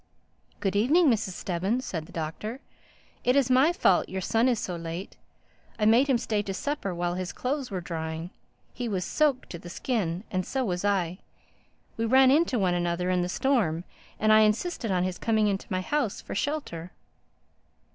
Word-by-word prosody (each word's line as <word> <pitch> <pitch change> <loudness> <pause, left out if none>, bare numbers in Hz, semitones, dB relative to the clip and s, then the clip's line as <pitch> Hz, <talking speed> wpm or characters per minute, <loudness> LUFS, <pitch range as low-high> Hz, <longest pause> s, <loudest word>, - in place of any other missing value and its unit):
"Good 195 -2 -1
evening, 285 - +4
Mrs. 215 -4 -1
Stubbins," 195 +10 -2
said 160 -3 -4
the - - -14
Doctor. 175 +10 -5 0.6
"It 250 - +3
is 270 -2 +3
my 265 +6 +5
fault 355 - +2
your 190 - -3
son 225 +6 +2
is 245 -2 +2
so 180 - -3
late. 170 +2 -6 0.6
I 210 - +1
made 235 +6 +5
him 265 -3 +3
stay 215 -2 -1
to 195 -2 -4
supper 285 -5 -2
while 175 0 -1
his 180 0 -3
clothes 270 +1 -3
were 190 -3 -3
drying. 160 0 -5 0.4
He 245 -1 -3
was 185 -4 -1
soaked 290 -4 +1
to 170 - -6
the 175 - -10
skin; 190 -4 -2
and 185 -1 0
so 265 +6 -2
was 180 -3 -2
I. 190 -3 0 0.8
We 225 - 0
ran 260 +3 +6
into 300 -3 +3
one 185 -4 +2
another 175 +1 0
in 180 -1 +2
the 175 - -2
storm 185 - +1 0.4
and 215 0 +4
I 215 - +7
insisted 220 +4 +1
on 180 -2 +1
his 185 -1 -3
coming 220 -2 +2
into 195 -1 -2
my 185 -1 -1
house 260 0 -1
for - - -8
shelter." 200 - -3
205 Hz, 185 wpm, -27 LUFS, 180-255 Hz, 0.8 s, I